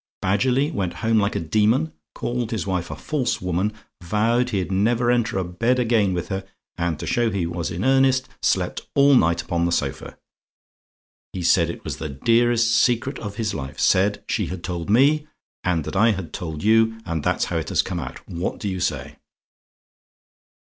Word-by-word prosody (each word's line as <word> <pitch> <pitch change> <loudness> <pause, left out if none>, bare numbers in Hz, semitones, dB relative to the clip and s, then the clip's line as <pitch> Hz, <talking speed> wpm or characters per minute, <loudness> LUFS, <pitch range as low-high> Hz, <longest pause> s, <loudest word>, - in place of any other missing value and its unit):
Badgerly 125 +10 +1
went 95 - -2
home 115 -1 +4
like 100 0 0
a - - 0
demon; 110 - +1 0.2
called 120 -1 -2
his 110 -8 -2
wife 90 -2 -2
a - - -5
false 140 -6 -2
woman: 90 +3 -1 0.3
vowed 115 +7 +1
he'd 95 -5 -2
never 120 +5 +2
enter 120 -4 +1
a 95 - 0
bed 115 +9 0
again 115 -5 +2
with 90 0 -4
her, 95 -1 -3 0.3
and 85 -3 -2
to - - -5
show 120 -1 +1
he 100 -5 -1
was 85 0 -3
in 90 +6 -3
earnest, 130 -1 +3
slept - - 0
all 140 0 +6
night 85 -9 +3
upon 85 0 0
the - - -1
sofa. 70 -5 -3 1.2
He 90 - -4
said 85 0 +3
it 85 - -7
was - - -5
the 80 - -5
dearest 115 - +2
secret 120 +3 +2
of 105 -2 -6
his 110 -3 -2
life; 65 -3 -6
said 100 +2 +2
she - - -1
had 90 -1 -6
told 85 0 -4
me; 145 +7 +4 0.4
and 85 -3 0
that - - -6
I 110 +3 +4
had 95 -4 -6
told 80 -3 -5
you; 115 +1 +4
and 80 -3 -3
that's - - +1
how - - -2
it - - -3
has - - +2
come - - -4
out. 65 -1 -8
What 85 +2 -4
do 105 - -4
you 95 -1 -3
say? - - -3
105 Hz, 190 wpm, -23 LUFS, 85-120 Hz, 1.2 s, all